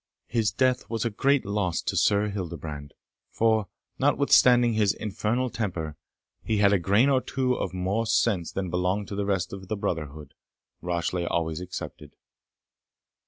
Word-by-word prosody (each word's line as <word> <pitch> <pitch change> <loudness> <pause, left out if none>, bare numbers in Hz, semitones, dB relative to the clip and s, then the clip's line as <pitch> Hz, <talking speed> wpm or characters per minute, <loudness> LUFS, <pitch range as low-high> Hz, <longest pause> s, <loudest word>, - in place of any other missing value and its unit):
His 115 -2 0
death 130 +4 +1
was 115 0 -2
a 115 - 0
great 140 +6 +2
loss 100 -4 -1
to - - -2
Sir 105 0 +3
Hildebrand, 80 -7 -6 0.3
for, 110 -2 +1 0.3
notwithstanding 120 -2 +4
his 105 -3 +2
infernal 110 +4 -2
temper, 85 -8 -3 0.5
he 110 - -1
had 100 0 +4
a 100 - +3
grain 100 +8 +3
or 135 -2 +3
two 130 -1 -1
of - - -3
more 95 +5 -1
sense 105 -6 +1
than 95 -3 -3
belonged 90 +3 -1
to 100 - -5
the 100 0 -2
rest 95 -3 -1
of 95 -1 -8
the 110 - -2
brotherhood, 75 -7 -4 0.5
Rashleigh 85 0 -2
always 80 0 -1
excepted. 90 0 -7
100 Hz, 155 wpm, -26 LUFS, 90-115 Hz, 0.5 s, notwithstanding